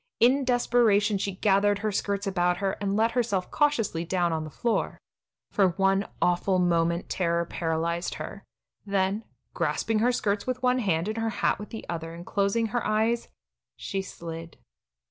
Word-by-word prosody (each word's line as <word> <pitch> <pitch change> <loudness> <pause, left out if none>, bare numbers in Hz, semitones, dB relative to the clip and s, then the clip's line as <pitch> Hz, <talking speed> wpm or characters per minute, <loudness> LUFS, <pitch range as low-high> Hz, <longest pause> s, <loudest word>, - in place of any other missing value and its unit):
In 260 +3 +4
desperation 230 -4 +3
she 195 -1 -2
gathered 200 +1 +3
her 215 - +1
skirts 200 0 -1
about 180 -2 +1
her, 195 0 0
and 200 -1 0
let 225 +1 +3
herself 230 -7 -1
cautiously 230 - +1
down 175 -1 0
on 160 -1 -1
the 155 - -7
floor. 230 - -1 0.5
For 190 -4 +2
one 195 +1 +2
awful 180 +2 +2
moment 170 -1 +1
terror 170 -2 0
paralyzed 170 +1 -2
her, 200 - -7 0.4
then, 200 +1 0 0.3
grasping 220 -1 0
her 240 +3 +3
skirts 205 -3 -1
with 255 0 -2
one 250 0 +3
hand 180 -6 0
and 215 +1 -3
her 225 0 0
hat - - 0
with 210 - -8
the 225 - -7
other 165 -1 -5
and 170 +1 -9
closing 200 +4 +1
her 240 +2 -1
eyes, 225 +2 +1 0.5
she 195 - -3
slid. 165 -3 -8
200 Hz, 165 wpm, -27 LUFS, 175-225 Hz, 0.5 s, In